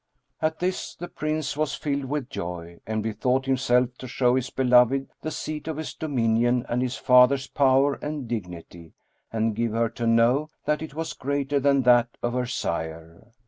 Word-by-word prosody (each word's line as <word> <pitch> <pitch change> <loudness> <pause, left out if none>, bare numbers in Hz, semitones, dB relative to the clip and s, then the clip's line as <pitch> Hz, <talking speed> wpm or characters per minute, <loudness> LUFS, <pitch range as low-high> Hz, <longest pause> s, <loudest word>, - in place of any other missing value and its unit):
At 160 0 0
this, 185 +1 -3
the 175 - -7
Prince 155 -3 -3
was 155 0 -1
filled 140 -3 -2
with 140 -1 -3
joy 85 -1 -6
and 110 -1 -2
bethought 125 +5 0
himself 125 -2 +2
to 130 - -7
show 125 0 +2
his 130 0 0
beloved 125 +1 +3
the 155 - -3
seat 155 0 -5
of 160 -2 -3
his 160 - -5
dominion 120 -4 +1
and 120 +1 -1
his 130 0 -2
father's 125 +1 +5
power 135 +2 +3
and 150 -4 -4
dignity 85 -6 -7 0.4
and 110 -1 0
give 115 0 -1
her 115 0 +1
to 115 0 -3
know 120 +6 +3 0.2
that 150 0 0
it 155 -2 -7
was 160 0 -3
greater 140 +1 -1
than 140 -1 +3
that 120 -1 +4
of 120 0 0
her 125 0 -1
sire. 80 -5 -4
125 Hz, 180 wpm, -25 LUFS, 115-140 Hz, 0.4 s, father's